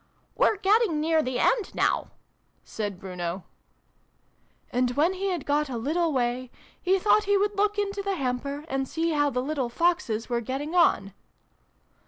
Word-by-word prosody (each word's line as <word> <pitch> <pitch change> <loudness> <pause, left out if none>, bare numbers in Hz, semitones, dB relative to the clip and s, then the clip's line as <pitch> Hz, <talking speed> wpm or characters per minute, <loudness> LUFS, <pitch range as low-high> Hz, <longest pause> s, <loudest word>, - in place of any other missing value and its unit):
("We're 430 - +2
getting 400 -4 +3
near 320 +1 +2
the 255 -4 -2
end 440 - +1
now," - - +1 0.5
said 205 -4 -5
Bruno.) 180 -1 -5 0.6
" - - -39
And, 250 0 +2
when 330 +6 +3
he 385 +1 -3
had 345 -6 -3
got 295 0 +1
a 245 - -3
little 320 +8 0
way, 250 -1 -1 0.3
he 375 +1 +3
thought 425 +2 +3
he 405 0 +3
would 410 +1 0
look 415 +1 +1
into 405 0 -1
the 395 -1 -1
hamper, 280 +1 -3
and 270 -3 -2
see 330 +3 -1
how 290 -2 +2
the 250 -2 -2
little 275 -3 -2
Foxes 285 -7 0
were 240 -1 -1
getting 275 +7 -4
on." 195 - +3
300 Hz, 170 wpm, -26 LUFS, 250-375 Hz, 0.6 s, getting